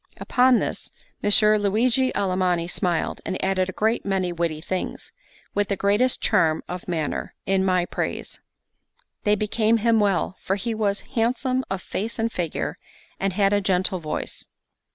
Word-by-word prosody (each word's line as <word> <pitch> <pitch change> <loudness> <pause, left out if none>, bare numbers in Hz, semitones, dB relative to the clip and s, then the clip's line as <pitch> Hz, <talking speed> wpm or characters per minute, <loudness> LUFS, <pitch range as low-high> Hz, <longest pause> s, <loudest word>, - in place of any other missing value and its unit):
Upon 255 0 +4
this - - -3 0.3
Messer 210 +1 +4
Luigi 235 +6 +2
Alamanni 185 -3 +1
smiled, 175 -1 -1
and 185 - -3
added 190 -1 +1
a - - -2
great 220 +5 0
many 190 -3 0
witty 165 -2 -1
things, 185 +3 -4 0.4
with 205 0 +1
the 200 - 0
greatest 205 +7 +2
charm 160 -1 +2
of 180 0 -6
manner, 160 -4 -2
in 190 0 +2
my 185 -2 +2
praise; - - -4 0.9
they 210 0 +4
became 215 +2 +2
him 225 0 +3
well, 195 -2 +1
for 190 - 0
he 215 +4 -2
was 205 -2 0
handsome 255 +3 +1
of 190 -1 -3
face 220 +4 -3
and 225 0 0
figure, 170 -6 -3 0.4
and 195 -1 0
had 200 +1 +3
a 205 - +3
gentle 185 0 +1
voice. 155 -2 -5
200 Hz, 155 wpm, -24 LUFS, 185-220 Hz, 0.9 s, Upon